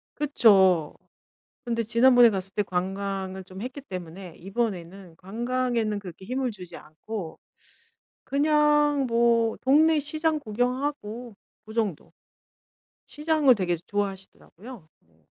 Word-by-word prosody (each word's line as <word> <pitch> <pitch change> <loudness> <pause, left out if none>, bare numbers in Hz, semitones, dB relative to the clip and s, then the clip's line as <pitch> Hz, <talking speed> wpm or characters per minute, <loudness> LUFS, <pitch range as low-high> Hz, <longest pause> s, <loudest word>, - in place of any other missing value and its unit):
그쵸. 195 - +4 0.7
근데 230 -1 -1
지난번에 240 +1 +5
갔을 195 -1 -4
때 210 - +1
관광을 190 0 -3
좀 185 +1 -11
했기 255 +5 -6
때문에 180 - -8
이번에는 190 -3 -4
관광에는 235 +2 -2
그렇게 185 -2 -10
힘을 255 +3 -2
주지 180 -5 -10
않고 160 +3 -8 0.9
그냥 295 -1 +2
뭐 230 -1 +2
동네 305 +3 +4
시장 310 +2 -1
구경하고 245 -1 -3 0.3
그 220 - -11
정도. 215 -8 -2 0.9
시장을 300 -3 +3
되게 180 -4 0
좋아하시더라고요. 195 +2 -6
뭐 80 -1 -33
220 Hz, 255 characters per minute, -26 LUFS, 190-255 Hz, 0.9 s, 지난번에